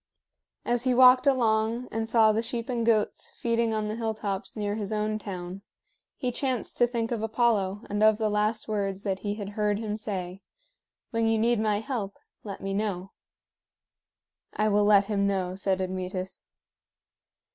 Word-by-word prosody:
As 240 +1 0
he 255 -1 +3
walked 255 +1 +7
along 230 -2 +2
and 225 0 -2
saw 225 -2 +5
the 215 +1 0
sheep 235 +1 -4
and 240 -2 -1
goats 225 -2 0
feeding 230 -1 +1
on 215 -1 -1
the 210 - -3
hilltops 215 -3 -3
near 205 -1 -1
his 210 -1 -4
own 215 0 -1
town, 185 -2 -7 0.6
he 250 -2 -1
chanced 255 -2 -2
to 240 - +5
think 235 -1 -2
of 230 -3 -1
Apollo 220 -3 0
and 205 +1 -2
of 215 0 +5
the 220 -1 0
last 210 +1 0
words 200 -2 -2
that 195 -2 -1
he 205 +1 -3
had 205 -2 -6
heard 210 0 0
him 215 -1 -3
say: 190 -3 -4 0.7
"When 230 -1 +1
you 225 0 +2
need 230 +1 +2
my 210 -1 +1
help, 225 -6 -4 0.3
let 200 -2 -7
me 195 0 -3
know." 195 -2 -2 1.4
"I 215 0 +2
will 205 0 +3
let 205 -1 +5
him 200 -1 0
know," 185 -2 -1
said 190 0 0
Admetus. 185 0 -4
215 Hz, 170 wpm, -27 LUFS, 200-230 Hz, 1.4 s, walked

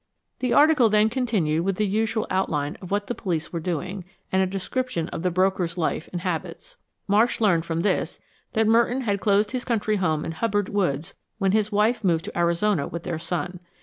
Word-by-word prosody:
The 250 -1 -1
article 295 -6 +5
then 215 +1 +4
continued 210 - 0
with 195 +1 0
the 210 - +1
usual 220 +2 0
outline 150 -6 0
of 185 - -8
what 205 +1 0
the 240 - -3
police 175 -8 -3
were 170 - -1
doing, 180 +3 -3 0.3
and 190 - +3
a 190 - +2
description 195 0 -2
of - - -5
the 180 - +1
broker's 185 -1 0
life 160 -1 -1
and 175 - -4
habits. 180 - -4 0.3
Marsh 215 +4 +3
learned 175 -7 +3
from 165 0 -1
this 190 0 0 0.3
that 225 -1 +2
Merton 235 +4 +3
had 200 -5 -1
closed 205 0 +2
his 255 -1 -2
country 215 -3 0
home 155 -5 0
in - - -3
Hubbard 205 +2 -1
Woods 175 -4 -1 0.2
when 195 -3 +1
his 215 +1 +1
wife 215 +2 +2
moved 165 -4 +1
to - - -7
Arizona 170 -1 +1
with 170 0 -6
their 165 -2 -3
son. 175 +2 -3
195 Hz, 200 wpm, -24 LUFS, 170-220 Hz, 0.3 s, article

